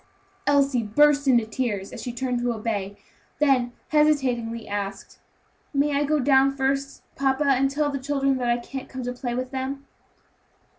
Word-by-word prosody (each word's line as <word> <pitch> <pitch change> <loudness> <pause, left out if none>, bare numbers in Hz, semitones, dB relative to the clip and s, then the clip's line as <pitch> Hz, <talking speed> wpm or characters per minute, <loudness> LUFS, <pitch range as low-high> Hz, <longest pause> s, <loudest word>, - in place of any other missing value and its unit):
Elsie 280 -3 +3
burst 285 +6 +3
into 240 -4 +4
tears, 220 -4 -3
as - - -7
she 245 - -4
turned 250 0 -2
to 245 0 0
obey, 205 -3 -3 0.4
then, 265 -5 +2 0.2
hesitatingly, 255 -7 +1
asked, 200 -1 -5 0.6
"May 285 +1 +2
I 290 +1 +2
go 305 +2 +2
down 275 0 +3
first, 275 +1 -1
papa, 275 +1 +1
and 270 -1 +3
tell 290 +1 0
the 275 - -3
children 275 0 0
that 245 -2 -1
I 240 - +3
can't 260 +2 -7
come 260 -1 -6
to 250 0 -3
play 245 -1 -4
with 255 0 -3
them?" 270 +1 -4
265 Hz, 165 wpm, -24 LUFS, 240-280 Hz, 0.6 s, into